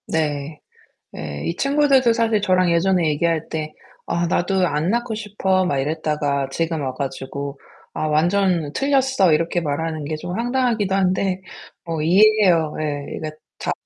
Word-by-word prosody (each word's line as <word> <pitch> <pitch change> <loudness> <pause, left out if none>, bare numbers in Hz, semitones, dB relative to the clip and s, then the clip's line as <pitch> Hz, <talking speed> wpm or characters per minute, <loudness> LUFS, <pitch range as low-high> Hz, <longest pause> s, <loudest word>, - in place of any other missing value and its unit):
네. 150 -1 -2 0.6
예 75 -1 -6
이 170 - -2
친구들도 275 -1 +3
사실 225 -2 +1
저랑 185 -2 +2
예전에 175 0 +2
얘기할 165 +1 0
때 155 -1 -4 0.3
"아 170 0 -1
나도 180 +1 +1
안 150 +2 -1
낳고 235 +1 -1
싶어." 195 -3 0
막 140 -6 0
이랬다가 145 -1 -1
지금 165 -2 -1
와 130 -2 -3
가지고 140 +1 -5 0.4
"아 155 - -2
완전 170 0 +1
틀렸어." 265 - +2
이렇게 165 +3 +1
말하는 155 +1 -2
게 155 +2 -3
좀 175 +3 -5
황당하기도 235 -4 0
한데 190 0 +1 0.4
뭐 165 -2 -3
이해해요. 185 -2 +4
예 145 -2 -3
이게 155 -1 -5 0.3
다 - - -2
170 Hz, 290 characters per minute, -21 LUFS, 150-200 Hz, 0.6 s, 이해해요